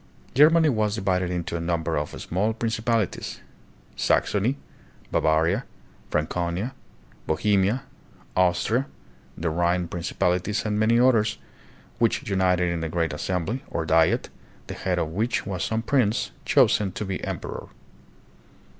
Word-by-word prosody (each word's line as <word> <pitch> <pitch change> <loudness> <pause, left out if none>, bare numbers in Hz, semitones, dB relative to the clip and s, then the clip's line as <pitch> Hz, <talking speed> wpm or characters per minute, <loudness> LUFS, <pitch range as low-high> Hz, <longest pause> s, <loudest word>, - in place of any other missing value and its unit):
Germany 160 +4 +6
was 110 -4 +1
divided 95 -3 0
into 85 -1 -3
a - - -1
number 85 -1 -1
of - - -3
small 105 +5 -1
princi 110 -1 -2
palities, 115 -4 -1 0.6
Saxony, 110 +7 +1 0.5
Bavaria, 80 +8 +2 0.5
Franconia, 85 - -1 0.5
Bohemia, 100 - +2 0.5
Austria, 95 +8 +2 0.5
the 80 0 -1
Rhine 85 +1 +1
principalities, 90 +4 -1
and 105 -1 0
many 115 +2 +4
others, 115 -4 +3 0.6
which 120 +3 +1
united 90 -3 +2
in 85 -1 -2
a 80 - -2
great 85 -1 -1
assembly, 95 - -2
or 80 -1 -2
Diet, 80 +9 +3 0.4
the - - -6
head 90 -1 -2
of 80 -3 0
which 110 +9 -1
was 95 -3 -3
some 110 0 -1
prince, 120 -3 +1
chosen 110 -7 +3
to 105 - -4
be 95 -1 -4
emperor. - - -5
95 Hz, 130 wpm, -25 LUFS, 85-110 Hz, 0.6 s, Germany